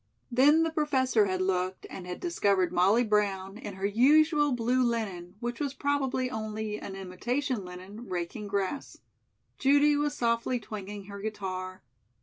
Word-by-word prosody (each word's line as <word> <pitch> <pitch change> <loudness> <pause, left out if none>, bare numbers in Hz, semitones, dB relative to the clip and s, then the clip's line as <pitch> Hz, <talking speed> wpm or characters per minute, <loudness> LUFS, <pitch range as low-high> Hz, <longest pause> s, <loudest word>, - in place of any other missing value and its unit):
Then 290 +6 +5
the 325 - 0
Professor 260 -8 +2
had 185 0 0
looked 185 0 -1
and 180 -2 -8
had 180 - -5
discovered 200 - +1
Molly 200 +7 +4
Brown, 205 -2 0
in 205 -6 -7
her 195 +1 -3
usual 295 +7 +4
blue 245 +1 +1
linen 205 -7 -2
which 240 0 -4
was 280 -2 -2
probably 270 -2 0
only 215 -2 -4
an 195 - -7
imitation 230 +6 -2
linen 185 +5 -10
raking 180 +4 -4
grass. 200 +6 -2 0.6
Judy 285 +2 +5
was 290 0 0
softly 235 +1 0
twanging 205 -2 -7
her 200 0 -8
guitar. 185 -4 -5
215 Hz, 145 wpm, -29 LUFS, 190-260 Hz, 0.6 s, Then